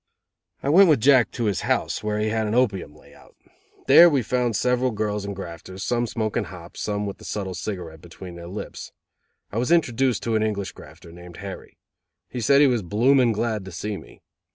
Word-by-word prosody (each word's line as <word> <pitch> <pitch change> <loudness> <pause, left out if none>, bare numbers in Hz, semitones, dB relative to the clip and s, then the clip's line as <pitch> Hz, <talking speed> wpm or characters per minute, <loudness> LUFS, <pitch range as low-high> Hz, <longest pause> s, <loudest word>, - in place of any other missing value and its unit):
I 140 - 0
went 185 +4 +7
with 150 -5 +4
Jack 130 -2 +5
to 120 - -3
his 100 -5 0
house, - - -1
where 105 0 -1
he 105 0 0
had 110 0 -1
an 105 - -1
opium 100 - 0
layout. - - -19 0.5
There 175 +1 +8
we 140 -5 +1
found 120 0 0
several 125 +3 +1
girls 105 -2 -2
and 100 0 -5
grafters, 95 +1 -8
some 120 0 0
smoking 110 -1 -2
hop, 85 -2 -11
some 105 0 -2
with 100 - -6
the - - -14
subtle 95 -3 -4
cigarette 85 -3 -6
between 90 +1 -11
their 85 0 -9
lips. 100 +4 -7 0.6
I 105 - -2
was 125 +6 -1
introduced 130 -7 +2
to 115 -1 0
an 110 - +2
English 105 -3 -2
grafter, 85 - -14
named 85 0 -12
Harry. 100 0 -9 0.5
He 125 - -5
said 140 +5 +5
he - - +7
was 125 -4 +2
bloomin' 120 +6 +3
glad 110 -1 -2
to 95 - -8
see 105 +5 -4
me. - - -13
105 Hz, 200 wpm, -24 LUFS, 95-125 Hz, 0.6 s, There